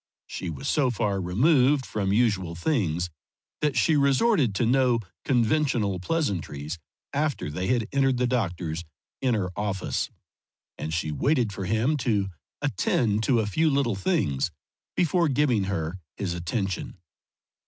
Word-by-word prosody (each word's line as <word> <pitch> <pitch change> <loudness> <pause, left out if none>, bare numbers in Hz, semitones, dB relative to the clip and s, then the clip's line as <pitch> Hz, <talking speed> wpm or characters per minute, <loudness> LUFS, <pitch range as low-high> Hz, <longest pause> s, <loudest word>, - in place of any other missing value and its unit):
She 90 - -5
was 135 - -5
so 140 -4 +2
far 105 -4 0
removed 130 - +3
from 100 -3 -1
usual 100 -6 +1
things 90 - 0 0.5
that 150 -2 0
she 160 - +4
resorted 140 - +3
to 120 - +2
no 125 -1 +3 0.2
conventional 120 -6 +1
pleasantries 90 - -2 0.3
after 145 - -1
they 90 +5 -2
had 120 -4 +1
entered 135 -2 +2
the 125 - +2
doctor's 85 -9 -1 0.4
inner 110 -8 +1
office, 100 -2 -2 0.7
and 80 - -5
she 80 -1 -1
waited 120 - +1
for 95 0 -4
him 110 +10 +1
to 105 -6 0 0.3
attend 110 -3 +1
to 120 -4 +3
a - - -1
few 155 +10 +2
little 135 -5 +1
things 70 -7 0 0.5
before 175 0 +2
giving 125 -7 +2
her 95 -2 -3 0.2
his 95 -4 -2
attention. 95 +3 -3
110 Hz, 135 wpm, -26 LUFS, 95-135 Hz, 0.7 s, she